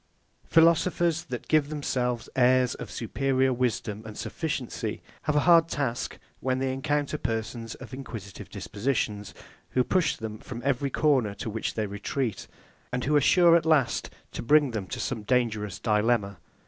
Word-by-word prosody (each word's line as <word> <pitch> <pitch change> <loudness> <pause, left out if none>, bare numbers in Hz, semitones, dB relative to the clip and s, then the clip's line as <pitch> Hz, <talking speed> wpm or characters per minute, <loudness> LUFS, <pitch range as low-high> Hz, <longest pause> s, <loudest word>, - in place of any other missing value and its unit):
Philosophers, 170 0 +3
that 125 -3 -6
give 155 -2 +3
themselves 125 -5 -2
airs 130 0 +4
of - - -8
superior 130 +2 0
wisdom 115 -4 -1
and 110 -1 -9
sufficiency, 155 -7 -4 0.2
have 150 - +1
a 150 - +4
hard 165 +1 +6
task 135 -7 -2 0.2
when 130 -1 0
they 130 0 -1
encounter 145 +2 -1
persons 115 -1 -3
of - - -11
inquisitive 110 -7 -8
dispositions, 105 -2 -2 0.4
who 130 - +3
push 185 +5 +1
them 110 -1 -6
from 120 - -7
every 140 0 +1
corner 130 -8 +2
to 110 - -5
which 110 +1 -3
they 110 - 0
retreat, 105 +4 -3 0.4
and 125 0 -2
who 150 +2 +1
are 145 - +5
sure 170 +4 +6
at 170 - +4
last 155 -6 +2 0.2
to - - -5
bring 145 +2 +4
them 105 -4 -4
to - - -5
some 120 -4 -2
dangerous 105 -4 0
dilemma. 105 -3 +1
125 Hz, 160 wpm, -27 LUFS, 110-145 Hz, 0.4 s, hard